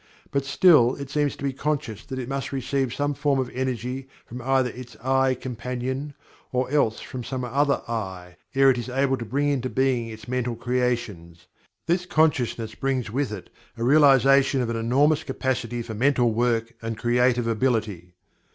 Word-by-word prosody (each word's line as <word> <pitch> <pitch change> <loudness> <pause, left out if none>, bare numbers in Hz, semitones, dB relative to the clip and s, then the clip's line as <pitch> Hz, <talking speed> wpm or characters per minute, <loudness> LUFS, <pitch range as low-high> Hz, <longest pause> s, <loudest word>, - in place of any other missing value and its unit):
But 140 -1 0
still 140 -4 +5
it 140 -1 -8
seems 145 -1 0
to - - -11
be 140 -1 -1
conscious 135 -6 -3
that 130 - -5
it 125 -2 -4
must 135 0 -3
receive 135 -1 -1
some 145 +3 -1
form 145 0 +1
of 130 -1 -2
energy 130 +1 -3 0.2
from 125 +2 -8
either 130 -1 +1
its 125 0 -10
"I" 130 0 +2
companion, 125 +3 -4 0.4
or 125 +1 -1
else 115 -7 +1
from 125 -1 -7
some 130 +1 -4
other 140 +3 +1
"I" 95 -6 -5 0.2
ere 135 0 +6
it 125 - -1
is 120 +1 -5
able 135 +1 +1
to 115 - -6
bring 140 +6 0
into 130 -3 -1
being 130 -3 +1
its 110 +1 -10
mental 125 -1 -1
creations. 115 -9 -2 0.4
This 175 +2 0
consciousness 125 -9 +1
brings 130 -5 -2
with 135 0 -1
it 105 -4 -8 0.3
a 115 - -3
realization 135 0 +5
of 120 -1 -1
an - - -2
enormous 140 +7 +2
capacity 120 -3 -2
for 115 -1 -7
mental 125 +1 +2
work 115 0 0
and 115 -1 -4
creative 120 +1 +2
ability. 110 -7 -1
125 Hz, 175 wpm, -24 LUFS, 115-135 Hz, 0.4 s, ere